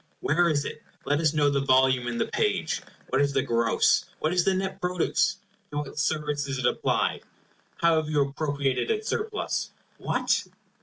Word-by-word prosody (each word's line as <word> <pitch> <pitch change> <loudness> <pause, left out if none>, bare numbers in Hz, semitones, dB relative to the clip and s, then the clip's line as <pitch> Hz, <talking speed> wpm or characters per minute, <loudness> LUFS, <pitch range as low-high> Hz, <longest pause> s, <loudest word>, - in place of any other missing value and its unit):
Where 170 +4 +2
is 145 -2 0
it? - - -6 0.2
Let 145 +1 +1
us 155 -2 +3
know 145 -1 +3
the 140 -1 +1
volume 130 -2 +3
and 120 -1 -2
the - - +2
page. 430 -2 -1 0.3
What 135 - +2
is 140 0 +1
the - - +2
gross, 115 -1 +2
what 155 +2 -1
is 180 -1 +3
the 190 +1 +2
net 190 0 -3
produce? 180 -1 +1 0.3
To 145 - -5
what 145 -1 -4
service 150 -2 -1
is 135 -1 -3
it 125 - -2
applied? - - +1 0.6
How 170 -1 +5
have 155 -1 -1
you 150 -2 +3
appropriated 140 - -1
its 435 -1 -1
surplus? 430 -1 -2 0.3
What! - - 0
150 Hz, 185 wpm, -26 LUFS, 140-175 Hz, 0.6 s, How